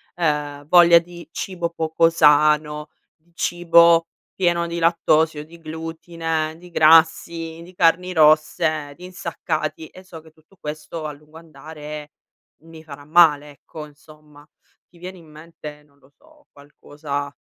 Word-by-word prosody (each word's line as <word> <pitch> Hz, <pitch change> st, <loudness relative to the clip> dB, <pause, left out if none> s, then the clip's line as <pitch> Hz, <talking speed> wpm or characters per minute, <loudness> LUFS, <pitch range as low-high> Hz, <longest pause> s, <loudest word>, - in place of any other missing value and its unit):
ehm, 150 Hz, -4 st, -2 dB
voglia 170 Hz, 0 st, +7 dB
di 170 Hz, 0 st, -5 dB
cibo 175 Hz, -2 st, -4 dB
poco 165 Hz, 0 st, +1 dB
sano, 150 Hz, -1 st, +2 dB, 0.3 s
di 165 Hz, +2 st, -36 dB
cibo 170 Hz, -1 st, +3 dB, 0.3 s
pieno 175 Hz, -2 st, 0 dB
di 170 Hz, 0 st, -5 dB
lattosio, 160 Hz, -2 st, +1 dB
di 170 Hz, +2 st, -16 dB
glutine, 160 Hz, 0 st, -5 dB
di 180 Hz, 0 st, -15 dB
grassi, 165 Hz, +1 st, +3 dB
di 180 Hz, -, -15 dB
carni 180 Hz, +2 st, +1 dB
rosse, 155 Hz, -1 st, +2 dB
di 180 Hz, +3 st, -13 dB
insaccati, 195 Hz, -, -5 dB
e 185 Hz, -, -16 dB
so 170 Hz, -3 st, -12 dB
che 160 Hz, -, -18 dB
tutto 160 Hz, +5 st, -28 dB
questo 155 Hz, +1 st, -7 dB
a 150 Hz, -, -4 dB
lungo 150 Hz, +2 st, -16 dB
andare 150 Hz, -1 st, -11 dB, 0.5 s
mi 160 Hz, 0 st, -15 dB
farà 145 Hz, -2 st, -12 dB
male, 150 Hz, -3 st, +4 dB
ecco, 150 Hz, +2 st, -11 dB
insomma. 150 Hz, 0 st, -19 dB, 0.4 s
Ti 175 Hz, -, -23 dB
viene 185 Hz, +1 st, -9 dB
in 170 Hz, -, -17 dB
mente, 150 Hz, -1 st, -12 dB
non 140 Hz, -1 st, -31 dB
lo 135 Hz, +1 st, -26 dB
so, 310 Hz, -1 st, -25 dB
qualcosa 145 Hz, 0 st, -7 dB
160 Hz, 140 wpm, -21 LUFS, 150-170 Hz, 0.5 s, voglia